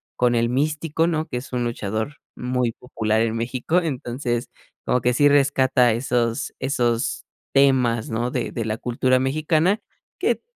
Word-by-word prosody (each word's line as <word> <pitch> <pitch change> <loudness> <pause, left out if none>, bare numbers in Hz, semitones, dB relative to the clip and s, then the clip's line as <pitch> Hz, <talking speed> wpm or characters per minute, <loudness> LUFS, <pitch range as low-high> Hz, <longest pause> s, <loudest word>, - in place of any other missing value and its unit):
con 125 -1 +2
El 115 0 +2
Místico, 150 +4 0
¿no? 160 -2 -1
Que 125 - -4
es 130 +1 -8
un 125 -1 0
luchador 110 +3 -3 0.2
muy 125 -1 -1
popular 110 -3 -1
en 115 0 0
México, 125 +8 0
entonces, 125 -5 -3 0.4
como 125 - +1
que 125 +1 +2
si 145 +4 +5
rescata 135 -3 +4
esos 120 -1 -1
esos 120 -3 0 0.3
temas, 130 -5 +3
¿no? 120 +2 -1
De - - -2
de 115 - -3
la 110 0 -2
cultura 130 +2 +1
mexicana, 155 - +1 0.4
que - - +2
t - - -28
125 Hz, 160 wpm, -23 LUFS, 120-140 Hz, 0.4 s, si